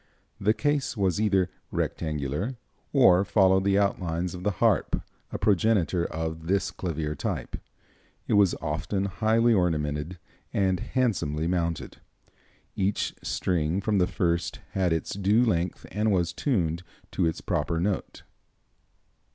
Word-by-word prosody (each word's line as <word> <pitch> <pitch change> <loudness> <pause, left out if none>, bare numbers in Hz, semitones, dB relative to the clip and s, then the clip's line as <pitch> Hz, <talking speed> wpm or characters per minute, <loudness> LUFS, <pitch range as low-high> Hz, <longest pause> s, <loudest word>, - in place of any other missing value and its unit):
The 105 +3 +2
case 145 -4 0
was 95 -1 +1
either 95 -4 +2 0.2
rectangular, 75 - -2 0.4
or 100 -10 +6
followed 95 -1 +3
the 100 0 +3
outlines 90 -3 0
of 90 - -7
the 105 - +1
harp, 110 -8 +2 0.3
a - - -3
progenitor 95 -4 +2
of 80 0 -4
this 95 0 +1
clavier 80 -4 -3
type. 75 - -4 0.7
It - - 0
was 100 -3 +4
often 80 +6 -1
highly 110 +4 +2
ornamented, 80 -3 0 0.3
and 95 -2 +1
handsomely 85 - 0
mounted. 85 -2 -2 0.8
Each 100 +1 0
string 85 0 0
from 100 0 +1
the 90 - +3
first 85 -1 -1
had 95 -3 +1
its 80 -1 -1
due 100 +5 +3
length 90 -5 -1
and 105 +2 +1
was 85 -3 +1
tuned 85 - 0 0.3
to - - +1
its 80 - -2
proper 85 - -1
note. 95 +2 -2
95 Hz, 130 wpm, -27 LUFS, 85-100 Hz, 0.8 s, or